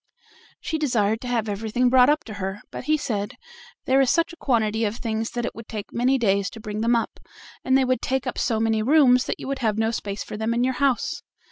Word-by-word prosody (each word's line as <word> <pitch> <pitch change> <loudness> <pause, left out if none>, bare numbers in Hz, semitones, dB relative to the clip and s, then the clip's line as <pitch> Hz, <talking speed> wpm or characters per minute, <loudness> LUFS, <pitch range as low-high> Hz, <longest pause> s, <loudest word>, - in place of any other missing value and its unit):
She 320 - -3
desired 225 -7 +1
to 250 - -6
have 235 -3 0
everything 220 +4 0
brought 250 +1 +6
up 300 +1 +2
to 220 - -9
her, 195 +2 -4
but - - -7
he 310 0 +2
said: 210 -8 -3 0.5
"There 265 +1 +4
is 265 - +3
such 335 +4 +1
a - - -9
quantity 225 -7 0
of 210 0 -1
things 225 -2 -2
that 240 -1 -3
it - - -4
would 230 0 -10
take 210 -3 -7
many 255 +3 +2
days 200 -5 +1
to 225 - -11
bring 215 -1 -5
them 235 +1 +3
up, 230 - -2 0.4
and 260 0 +3
they 265 - +2
would 255 0 0
take 265 0 -1
up 255 - -3
so 225 -2 0
many 225 -1 +1
rooms 255 0 +5
that - - -3
you - - -7
would 275 0 -3
have 220 -3 0
no 225 0 +1
space 200 -3 -4
for - - -7
them 220 +2 -1
in 240 - +1
your 260 +1 +1
house." 280 +2 +1
235 Hz, 250 wpm, -24 LUFS, 220-260 Hz, 0.5 s, brought